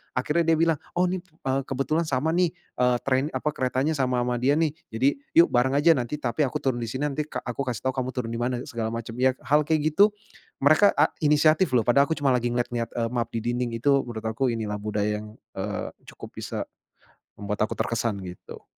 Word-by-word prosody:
akhirnya 150 +6 +1
dia 165 - +5
bilang, 165 -2 +3 0.2
"Oh 180 - +3
nih, 185 - -2
eee, 135 -6 -3
kebetulan 155 +5 -1
sama 155 +4 0
nih," 175 -2 +2 0.3
eee, 125 0 +3
train, 130 0 +1
apa 150 - 0
keretanya 130 +3 0
sama 125 -2 +1
ama 120 -1 -1
dia 135 +4 +3
nih, 155 -1 +2 0.2
"jadi 125 +5 +2 0.3
yuk 335 - +6
bareng 130 +3 +2
aja, 150 +4 +5
nanti 125 +3 -2
tapi 135 +2 0
aku - - -3
turun 130 -3 0
di 115 - -3
sini, 130 +6 -2
nanti 150 +2 -3
ka - - -5
aku 120 - -6
kasih 120 -3 -3
tahu - - -16
kamu 130 0 -1
turun 115 -3 -3
di - - -4
mana, 125 +1 -1
segala 115 -5 -3
macam 115 +1 -6
ya," 130 0 +3
hal 150 +1 +2
kayak 155 -1 +1
gitu 205 +5 +4 0.5
mereka 155 +8 +5
a 150 +2 +3
inisiatif 150 0 +4
loh, 115 - +4
padahal 140 +5 +4
aku 160 - 0
cuma 140 -2 +2
lagi 120 -1 +1
ngelihat-lihat, 120 -1 -2
eee, 115 -1 0
map 120 -2 -1
di - - +1
dinding 120 -1 -2
itu 140 +4 +3
menurut 110 -2 -6
aku 110 +4 0
inilah 105 -2 -3
budaya 105 0 -1
yang, 105 +1 -11 0.2
eee, 100 +1 -3 0.2
cukup - - -10
bisa - - -4 0.7
membuat 105 0 -4
aku - - -5
terkesan 115 -2 -1
gitu. 90 -1 -10
130 Hz, 215 wpm, -25 LUFS, 115-150 Hz, 0.7 s, yuk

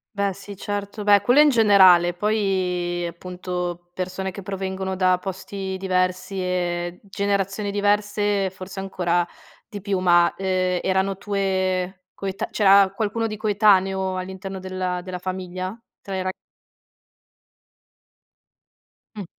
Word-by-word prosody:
Beh 200 -1 0
sì, 200 +1 -10
certo, 205 +1 -4
beh 205 -1 +6
quello 255 +4 +5
in 300 - +6
generale. 190 -7 +6
Poi 180 -3 0
appunto 180 0 -5
persone 185 +1 -4
che 200 - -8
provengono 190 0 -4
da 185 -1 +3
posti 190 0 -5
diversi 185 0 -1
e 175 -1 -2
generazioni 200 +1 -1
diverse 205 -1 +1
forse 190 +1 -9
ancora 175 -2 0 0.4
di 205 -3 -6
più, 195 -1 -1
ma, 175 -1 +4
ehm, 185 -1 0
erano 190 0 0
tue 190 -2 -1
coeta 195 -1 -4
c'era 195 -2 +5
qualcuno 225 +2 -1
di 215 -1 -5
coetaneo 195 -3 +2
all'interno 190 +1 -6
della 185 -1 -3
della 180 0 -6
famiglia? 185 +2 -5 0.2
Tra 195 -1 -6
le 185 - -2
ra 185 - -1 2.8
Mh. 205 -3 -6
190 Hz, 120 wpm, -23 LUFS, 185-200 Hz, 2.8 s, beh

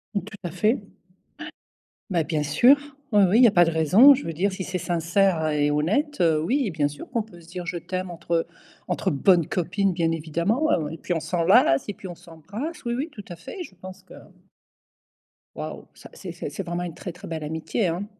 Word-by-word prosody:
Tout 200 - 0 0.2
à 175 - -4
fait. 210 +7 +2
Ouais. 220 - -8 1.3
Bah 170 -4 +1
bien 150 0 -1
sûr, 195 - +6 0.4
oui, 205 -1 +6
oui, 205 - +4
il 250 - +7
y - - +9
a - - +4
pas 175 -3 +6
de 165 - +2
raison, 185 - +7
je 285 - -6
veux 165 - -3
dire 190 +6 0
si 190 0 -5
c'est 185 0 -3
sincère 170 0 +1
et 150 -1 +1
honnête, 210 - 0 0.2
oui, 260 - +1
bien 150 -3 +1
sûr 145 - -9
qu'on 235 -3 0
peut 180 -5 -15
se 165 - -17
dire 175 0 -7
«je 175 - -3
t'aime», 185 +2 -4
entre, 170 0 -11
heu, 165 -1 +1 0.4
entre - - -1
bonnes 170 +3 +3
copines, 190 +2 0
bien 165 -1 0
évidemment, 170 - 0
et 160 - -7
puis 175 - -3
on 165 - 0
s'enlace 165 -5 +3
et 205 - -3
puis, 190 - -10
on 175 - -7
s'embrasse, 200 - -8
oui, 235 0 -1
oui, 290 +6 -3
tout 210 -7 -10
à 175 - -6
fait, 355 - -8
je 195 - -13
pense 185 +1 -11
que - - -14 1.4
Waouh, - - -6
ça - - -14
c'est - - -8
c'est - - -6
c'est 195 - -5
vraiment 175 0 -3
une 175 -2 -5
très, 180 +1 -7
très 180 +1 -11
belle 160 -2 -4
amitié, 160 +6 -2
hein. 175 +4 -2
175 Hz, 220 wpm, -24 LUFS, 165-200 Hz, 1.4 s, y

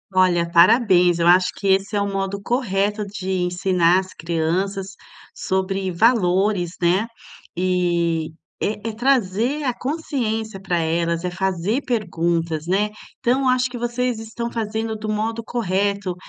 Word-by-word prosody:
Olha, 175 -2 +3
parabéns, 180 -1 +5
eu 170 - +2
acho 180 +1 +5
que 200 - -3
esse 195 +2 +2
é 205 - +2
o 200 - 0
modo 195 0 -3
correto 210 -3 0
de 195 -1 -6
ensinar 180 -1 +2
as 190 0 -7
crianças 185 +4 -2 0.4
sobre 190 0 -1
valores, 185 -3 +2
né. 180 +6 +2 0.5
E, 175 -3 0 0.3
é 210 +2 -2
é - - -3
trazer 245 +2 +1
a 250 - +1
consciência 235 -8 -3
para 180 -2 -1
elas, 170 +1 0
é - - 0
fazer 190 +6 -1
perguntas 170 -8 -1
né. 200 +4 +1 0.3
Então 260 +3 +1
acho 255 0 +2
que 245 - -7
vocês 240 0 -1
estão 225 +1 -5
fazendo 220 0 -3
do 215 0 -5
modo 225 +2 -2
correto 200 -4 -1
195 Hz, 140 wpm, -21 LUFS, 180-225 Hz, 0.5 s, parabéns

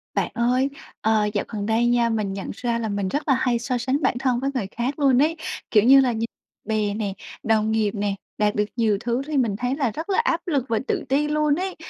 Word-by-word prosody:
Bạn - - 0
ơi, 250 +3 +2 0.3
ờ, 220 -1 +2
dạo 205 - -1
gần 205 -2 -4
đây 225 +2 +2
nha, 240 -1 +3
mình 215 -4 -1
nhận 195 0 -5
ra 235 +1 -2
là 225 -2 -2
mình 200 -1 -1
rất 290 +10 -2
là 275 - +5
hay 245 -2 +1
so 245 +1 -1
sánh 260 +5 -1
bản 255 -2 +1
thân 255 -2 +1
với 275 - -1
người 240 -8 -2
khác 255 +5 -3
luôn 270 -3 +4
ấy, 315 +3 +2 0.4
kiểu 210 -2 +5
như 270 +3 +8
là, 250 -2 +1
nh 220 - -4 0.5
bè 210 -1 0
nè, 205 -2 -2 0.3
đồng 220 -1 +2
nghiệp 220 -2 +1
nè, 205 -1 -1 0.2
đạt 210 -1 +1
được 210 - +2
nhiều 220 -4 +2
thứ 240 +3 -1
thì 305 -2 -1
mình 230 -6 +1
thấy 245 +5 -1
là 270 -6 0
rất 315 - -6
là 390 - +2
áp 415 -8 +1
lực 280 -7 0
và 225 -1 +1
tự - - -1
ti 285 +3 +2
luôn 300 -1 +2
ấy. 370 +2 -3
240 Hz, 250 wpm, -23 LUFS, 215-275 Hz, 0.5 s, như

